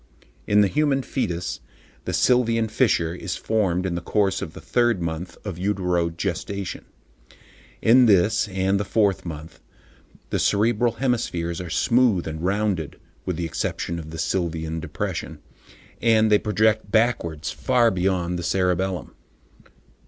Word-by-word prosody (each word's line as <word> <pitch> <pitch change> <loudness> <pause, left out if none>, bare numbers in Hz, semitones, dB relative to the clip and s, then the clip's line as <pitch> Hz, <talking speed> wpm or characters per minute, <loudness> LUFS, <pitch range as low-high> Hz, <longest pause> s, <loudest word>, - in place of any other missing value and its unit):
In 105 0 +5
the 100 - +4
human 140 +2 +1
foetus, 90 -11 -3 0.5
the - - -2
sylvian 115 -3 +2
fissure 105 -9 +2
is 90 -1 -4
formed 95 -5 0
in 90 - -1
the 85 - -3
course 100 +2 0
of 80 - -6
the - - -10
third 120 -4 +1
month 85 +1 -4
of 95 -5 -5
uterogestation. 90 0 -2 1.0
In 120 +2 +6
this, 105 +3 +3
and 95 -1 -9
in 95 +1 +2
the 100 - -1
fourth 100 -3 +1
month, 80 0 -8 0.7
the - - 0
cerebral 115 +2 +2
hemispheres 90 -10 -1
are 90 - -7
smooth 115 -2 +2
and 80 0 -5
rounded 95 -4 -1 0.3
(with 90 - -1
the 85 +1 -3
exception 85 +1 -3
of 80 -1 -8
the 80 - -7
sylvian 80 -1 -2
depression), 75 - -4 0.6
and 110 -2 +4
they 105 - +6
project 110 -1 +1
backwards 95 -10 +1
far 120 -3 +2
beyond 90 -1 0
the - - -5
cerebellum. 90 -1 -1
95 Hz, 140 wpm, -23 LUFS, 85-110 Hz, 1.0 s, In